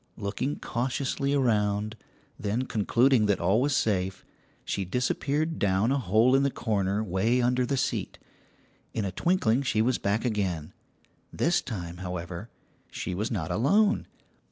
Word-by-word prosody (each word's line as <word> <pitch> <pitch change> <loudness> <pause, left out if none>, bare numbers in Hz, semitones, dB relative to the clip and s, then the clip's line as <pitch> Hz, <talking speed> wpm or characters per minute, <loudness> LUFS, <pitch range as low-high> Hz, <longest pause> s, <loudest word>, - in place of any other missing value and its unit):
Looking 110 +8 -2
cautiously 135 +3 -1
around, 105 -4 +1 0.4
then 110 +5 -1
concluding 120 +1 +3
that 100 - +2
all 105 +5 +2
was 140 0 +1
safe, 95 -5 -1 0.4
she 100 - -2
disappeared 140 - -1
down 100 +4 +2
a 140 - +2
hole 110 +3 +3
in 135 - +4
a 140 - +3
corner 105 -4 -1
way 110 +5 +1
under 125 0 +2
the 140 - 0
seat. - - -2 0.8
In 110 - -1
a 95 - -2
twinkling 135 - +2
she 125 -5 0
was 120 +3 +2
back 100 +5 0
again; 95 -9 -2 0.6
this 175 +1 +1
time, 90 -7 -6
however, 90 +2 -6 0.4
she 90 - -4
was 105 +5 -2
not 90 -8 -3
alone. 200 - +2
110 Hz, 145 wpm, -27 LUFS, 100-130 Hz, 0.8 s, in